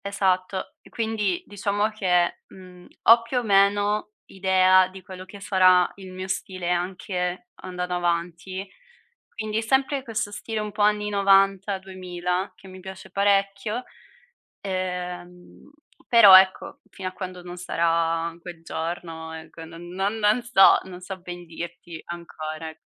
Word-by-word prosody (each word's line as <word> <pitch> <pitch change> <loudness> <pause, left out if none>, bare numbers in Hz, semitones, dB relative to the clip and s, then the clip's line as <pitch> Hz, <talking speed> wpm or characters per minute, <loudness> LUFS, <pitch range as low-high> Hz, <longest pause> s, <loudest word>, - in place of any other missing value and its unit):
Esatto. 190 -1 -1
E - - -18
quindi 220 -5 -1
diciamo 205 +1 -1
che, 180 -5 +1
mhmm, 180 -1 -14 0.2
ho 230 +1 +7
più 235 +2 -4
o 245 - +1
meno 205 +1 +2
idea 185 -1 +4
di 190 +1 -12
quello 185 0 -10
che 200 +2 -12
sarà 185 -2 +4
il 190 -2 -11
mio 185 +1 -6
stile 185 -2 -3
anche 180 +3 -3
andando 180 -1 -4
avanti. 175 +2 -2 0.6
Quindi 215 0 -3
sempre 265 +4 +1
questo 225 -4 -3
stile 220 +1 -4
un 210 0 -4
po' 210 +1 -4
anni 210 0 +2
'90, 195 0 +3
2000, 185 -1 -4
che - - -16
mi 185 0 -11
piace 190 0 -10
parecchio, 200 +3 +1 0.8
ehm, 180 0 -6 0.4
però 210 -5 +9
ecco, 190 0 +1
fino 185 -1 -6
a - - -17
quando 185 -1 -7
non 175 0 -9
sarà 165 -1 0
quel 170 -1 -10
giorno, 160 -1 -5
ecco, 160 0 -10
no, 165 +1 -12
non 185 +5 -3
non 215 +2 +2
so, 235 -5 +6
non 180 -1 -9
so 185 +1 -7
ben 175 0 -8
dirti 170 0 -8
ancora, 160 -2 -7
ec 160 - -13
185 Hz, 145 wpm, -24 LUFS, 180-200 Hz, 0.8 s, però